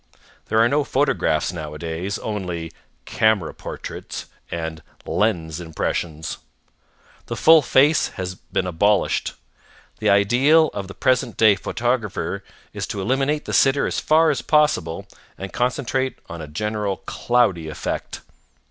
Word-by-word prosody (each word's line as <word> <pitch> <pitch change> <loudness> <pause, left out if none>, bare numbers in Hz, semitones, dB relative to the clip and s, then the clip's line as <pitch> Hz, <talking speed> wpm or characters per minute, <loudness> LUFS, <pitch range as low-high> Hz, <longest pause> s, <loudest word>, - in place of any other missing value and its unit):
There 110 - 0
are 115 - +6
no 145 +4 +2
photographs 135 - +1
nowadays. 80 +4 -4
Only 90 -6 -4 0.3
"camera 110 -6 +1
portraits" - - -7 0.2
and 80 -2 -4 0.2
"lens 85 -7 0
impressions." 80 -1 -3 0.9
The - - -3
full 160 0 +7
face 145 +3 +4
has 95 0 -3
been 90 0 -3
abolished. 100 +4 +1 0.6
The - - +1
ideal 125 +11 +5
of 100 -2 -5
the 95 - -10
present 125 -3 +1
day 110 -2 +6
photographer 120 +1 -2 0.3
is - - -4
to - - -4
eliminate 135 +8 0
the - - -5
sitter 135 +1 +4
as - - -1
far 160 +1 +4
as - - -2
possible 150 - +1 0.3
and 95 0 -7
concentrate 130 +1 -1
on 85 -1 -7
a 80 - -7
general 105 +5 -2
cloudy 110 -10 +1
effect. - - -4
105 Hz, 130 wpm, -22 LUFS, 85-130 Hz, 0.9 s, full